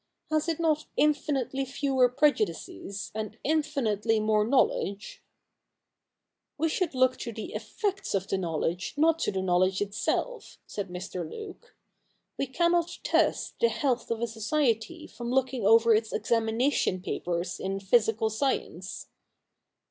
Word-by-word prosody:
Has 310 +1 +1
it 325 - -1
not 310 -2 +1
infinitely 285 -3 +1
fewer 265 -1 +2
prejudices 290 - -1
and 215 -1 -5
infinitely 245 -8 +1
more 215 0 +2
knowledge? 235 - 0 0.5
' - - -57 0.2
' - - -58
We 320 +2 +1
should 335 -3 -1
look 255 0 +3
to 235 - -5
the 220 -1 -7
effects 395 - -2
of 195 0 -1
the 195 - -1
knowledge, 170 +1 -2
not 325 +2 +4
to - - 0
the 190 -1 -2
knowledge 185 +1 +2
itself,' 205 - -2
said 200 -3 -5
Mr. 180 -2 -5
Luke. 430 +3 -10 0.3
' - - -46
We 275 - 0
cannot 340 +4 +1
test - - +1
the 470 - +4
health 255 -6 -1
of 230 0 -2
a 235 - +1
society 235 +6 -1
from 240 -1 -7
looking 255 -4 +1
over 230 +1 +6
its 220 0 +1
examination 225 -4 +1
papers 175 -1 -3
in 195 +1 -2
physical 220 +2 +2
science.' 210 - -2
235 Hz, 140 wpm, -28 LUFS, 205-300 Hz, 0.5 s, over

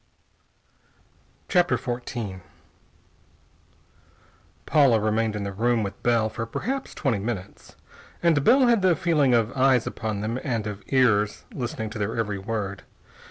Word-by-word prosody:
CHAPTER 175 -1 +3
XIV 120 -6 -5 2.2
Paula 135 -7 +4
remained 110 +1 0
in 105 - -3
the 100 - -3
room 115 +2 +1
with 100 - -6
Bell 115 -2 +2
for 115 +1 -5
perhaps 260 - -4
twenty 120 -7 0
minutes, 100 -2 -6 0.5
and 160 -4 +3
Bell 260 - +5
had 235 -4 +3
the 185 -2 +4
feeling 150 -8 +2
of 115 +1 0
eyes 130 -2 +3
upon 110 -2 -4
them 115 +4 -2
and 115 -5 -2
of 105 -1 -5
ears 110 -6 +2
listening 115 -4 -4
to 110 - -6
their 105 +3 -2
every 105 -3 -2
word. 100 -1 -4
115 Hz, 135 wpm, -25 LUFS, 105-135 Hz, 2.2 s, Bell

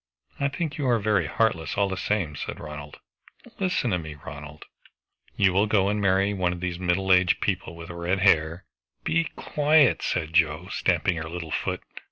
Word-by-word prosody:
"I 140 - +2
think 150 +1 -4
you 140 - 0
are 120 -2 +4
very 100 -6 +1
heartless, 90 -5 0
all 100 0 +3
the 95 - -3
same," 90 -6 -1
said - - -5
Ronald. 75 -1 -8 0.6
"Listen 180 - 0
to 90 - +1
me, 80 -2 -7
Ronald" 75 +1 -10 0.7
"You 95 -2 +3
will 100 +3 +3
go 100 -2 +3
and 105 0 0
marry 95 +1 +2
one 90 -2 0
of 90 - -7
these 90 -1 -3
middle 95 +1 +2
aged 90 -1 +4
people 85 - -2
with 85 +1 -9
red 85 +2 -1
hair" 85 -2 +3 0.4
"Be 165 0 +1
quiet," 150 -1 +3
said 80 -3 -2
Joe, 85 +2 +2
stamping 90 -1 +1
her 80 0 -5
little 85 -2 -6
foot. - - -2
90 Hz, 185 wpm, -26 LUFS, 85-105 Hz, 0.7 s, are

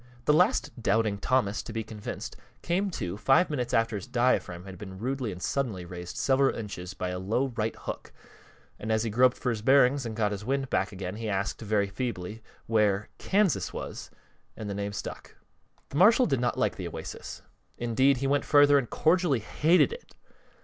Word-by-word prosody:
The 150 - +4
last 155 -6 +2
doubting 105 -1 +1
Thomas 115 -3 +1
to - - -9
be 110 0 -3
convinced 105 -1 -7 0.3
came 190 +4 0
to 95 - -4
five 135 +9 +3
minutes 125 -5 -2
after 115 -1 +2
his 100 - -5
diaphragm 120 -8 +1
had 95 -2 -10
been 95 -2 -8
rudely 125 +1 -2
and 90 - -8
suddenly 105 -3 -2
raised 90 0 -8
several 135 0 +2
inches 95 -4 -6
by 90 - -3
a 90 0 -3
low 115 +8 0
right 110 0 -1
hook, - - -7 0.7
and 110 - -3
as 110 0 +2
he 115 - -2
groped 125 +3 +4
for 125 - -1
his 110 -2 -3
bearings 135 +2 +4
and 115 -2 -5
got 105 -1 +1
his 100 0 -4
wind 135 +2 -1
back - - +1
again 95 0 -5
he 110 -1 -4
asked, 100 +2 -2
very 105 -2 +1
feebly, 105 -1 -5 0.2
where 105 -2 +1
"Kansas" 200 -3 +1
was; - - -6 0.5
and 110 - -6
the 100 - -3
name 100 0 -3
stuck. 100 - -7 0.5
The 140 - -4
marshal 225 - +6
did 135 - +1
not 120 - 0
like - - 0
the - - -4
Oasis; - - -7 0.3
indeed, 130 +3 +2
he 135 - -3
went 140 +1 +2
further 145 -1 +6
and 120 - -5
cordially 165 -3 +2
hated 160 - +3
it. 485 - -12
115 Hz, 190 wpm, -28 LUFS, 100-135 Hz, 0.7 s, marshal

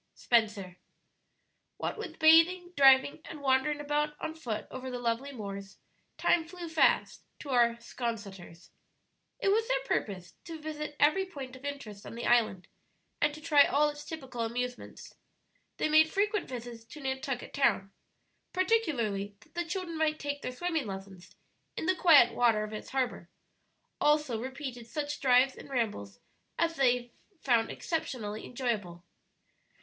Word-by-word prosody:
Spenser. 210 -6 0 1.0
What - - -3
with 380 -8 -7
bathing, 335 +3 +5
driving, 270 +2 +5
and 315 - -8
wandering 280 +2 +2
about 295 +1 -1
on 315 - -4
foot 240 -10 -4
over 260 0 -6
the 250 - -4
lovely 245 +3 -2
moors, 200 -5 -7 0.4
time 340 - +3
flew 345 +1 -8
fast 320 -1 +2 0.2
to 285 - -7
our 235 -2 +4
'Sconseters. 205 -8 -7 0.7
It - - +1
was 445 +3 +2
their - - 0
purpose 185 - -3
to 330 -2 -7
visit 300 -1 -5
every 345 +7 +3
point 270 -7 -8
of 260 - -14
interest 275 -8 -6
on - - -8
the 235 - -5
island, 220 -6 +2 0.5
and 295 - +3
to 310 - -11
try 300 -3 +6
all 295 +1 +3
its 295 0 -8
typical 265 -7 -6
amusements. 245 +2 -4 0.6
They - - +1
made 315 +1 +5
frequent 415 +2 0
visits 240 -2 -7
to 300 - -11
Nantucket 265 -2 -4
Town, 195 -8 +1 0.6
particularly 260 - 0
that - - -22
the 345 0 -2
children 335 -1 -4
might 310 -1 +1
take 285 -1 -4
their 255 - -4
swimming 320 -1 -2
lessons 195 -2 -9 0.4
in - - -3
the 370 - +3
quiet 300 -10 +6
water 230 -3 +3
of 215 0 -6
its 215 - -7
harbor; 260 -2 -2 0.7
also 295 -6 +2
repeated 260 -2 -6
such 295 +3 -4
drives 260 0 +4
and - - -12
rambles 205 - -2 0.4
as 330 0 +1
they 245 -3 +2 0.3
found 235 -4 +2
exceptionably 225 -10 -4
enjoyable. 215 -9 -3
265 Hz, 150 wpm, -30 LUFS, 230-310 Hz, 1.0 s, try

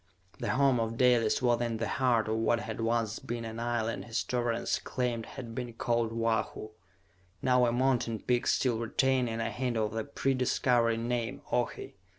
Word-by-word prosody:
The - - -2
home 130 +2 +3
of 115 0 -2
Dalis 120 -2 +3
was 120 -1 +3
in 115 -2 -1
the 115 - -2
heart 125 -4 +2
of 110 0 0
what 115 +1 +2
had - - -5
once 115 -1 0
been 120 0 -5
an 115 0 -6
island 115 -1 -2
historians 120 0 -1
claimed 120 -3 -2
had 120 -4 -8
been 120 -1 -5
called 115 -1 0
Oahu, 115 -1 -1 0.7
now 125 -1 +4
a - - +2
mountain 120 -2 +1
peak 120 +2 0
still 120 -4 +2
retaining 125 0 +1
a 115 - -1
hint 125 -2 -2
of 105 -1 0
the 110 +1 -2
pre 135 -1 -1
Discovery 120 -2 +2
name: 120 0 -2
Ohi. 120 -4 -2
120 Hz, 170 wpm, -30 LUFS, 115-125 Hz, 0.7 s, now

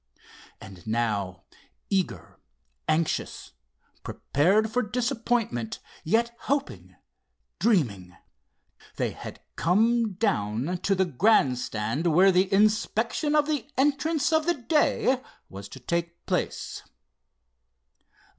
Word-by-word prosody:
And 95 -1 -13
now, 105 -5 -1 0.5
eager, 170 - -2 0.5
anxious, 155 +1 -1 0.5
prepared 195 +10 +1
for 250 +3 +1
disappointment 230 - -1 0.3
yet 230 +7 +1
hoping, 280 +1 -3 0.6
dreaming, 100 - 0 0.8
they - - -1
had - - -9
come 220 - +2
down 175 - -1
to 195 - +1
the 190 0 +2
grand 145 - +3
stand 115 +8 -2
where 180 +4 +5
the 185 +2 +2
inspection 220 +8 +2
of 300 -1 +4
the 300 -2 -2
entrants 295 +3 +1
of 315 +1 +2
the 345 - +3
day 265 -1 +1 0.3
was 100 +1 -9
to 130 - -10
take 170 +6 -3
place. - - -2
190 Hz, 100 wpm, -26 LUFS, -, 0.8 s, where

